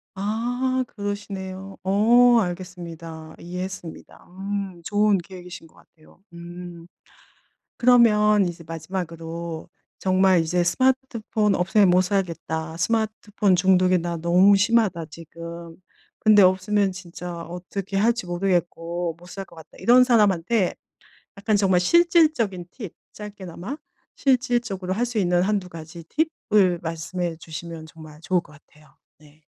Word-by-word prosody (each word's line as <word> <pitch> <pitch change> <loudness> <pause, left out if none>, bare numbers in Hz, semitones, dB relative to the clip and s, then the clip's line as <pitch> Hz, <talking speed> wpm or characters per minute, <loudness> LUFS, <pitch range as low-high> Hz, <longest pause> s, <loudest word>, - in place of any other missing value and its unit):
아. 245 +6 -1
그러시네요. 195 -2 -6
어. 235 +5 +5
알겠습니다. 170 -3 -7
이해했습니다. 180 -1 -7
음 195 -1 -5
좋은 205 +2 +2
계획이신 180 -1 -10
것 - - -26
같아요. 155 0 -23
음. 175 0 -10 0.9
그러면 210 -4 +5
이제 170 -1 -7
마지막으로 165 0 -6 0.3
"정말 185 -1 +3
이제 175 +2 0
스마트폰 230 0 +1
없으면 190 +2 +3
못 180 +1 +5
살겠다. 165 -4 -3
스마트폰 215 0 0
중독이 185 0 +4
나 170 0 -3
너무 180 +5 +5
심하다 200 -5 +2
지금. 170 +1 -10 0.4
근데 210 -2 +6
없으면 190 +2 +2
진짜 175 -1 -8
어떻게 180 +3 -5
할지 230 +1 +1
모르겠고 175 -2 -1
못 175 - -15
살 195 +2 -7
것 170 - -18
같다." 160 -1 -15
이런 250 +2 +6
사람한테 210 -4 +2 0.6
약간 210 +2 +1
정말 190 -3 +3
실질적인 305 - +3
팁 210 -9 -8 0.2
짧게나마 205 - -8 0.4
실질적으로 240 -8 0
할 230 +5 0
수 240 -2 -3
있는 175 -2 +2
1-2 195 -1 0
가지 165 0 -10 0.5
팁을 185 -5 +4
말씀해 165 +1 -4
주시면 160 0 -8
정말 155 -1 -13
좋을 180 +1 +1
것 150 - -19
같아요. 150 -1 -22 0.2
네. 150 0 -21
185 Hz, 280 characters per minute, -23 LUFS, 170-210 Hz, 0.9 s, 근데